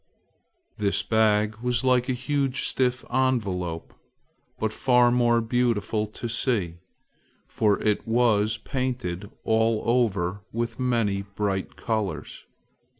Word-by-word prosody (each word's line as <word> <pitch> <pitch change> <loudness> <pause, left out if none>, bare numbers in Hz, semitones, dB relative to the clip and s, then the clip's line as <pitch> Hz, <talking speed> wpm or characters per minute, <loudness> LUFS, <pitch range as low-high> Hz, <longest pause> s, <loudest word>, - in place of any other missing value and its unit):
This 100 -1 +1
bag 110 -1 +2
was 125 +1 0
like 125 0 +2
a - - +2
huge 135 +1 -1
stiff 125 -1 0
envelope, 100 -11 -1 0.6
but 110 0 -2
far 125 -1 +4
more 120 -1 +3
beautiful 115 -2 0
to 110 +3 -6
see, 110 -8 0 0.7
for 105 -2 +1
it 105 0 0
was 110 -2 +2
painted 110 -7 -3
all 110 0 +2
over 100 -6 +1
with 115 +1 -3
many 115 -6 +1
bright 100 -1 -3
colors. 110 -5 -4
115 Hz, 110 wpm, -25 LUFS, 105-125 Hz, 0.7 s, far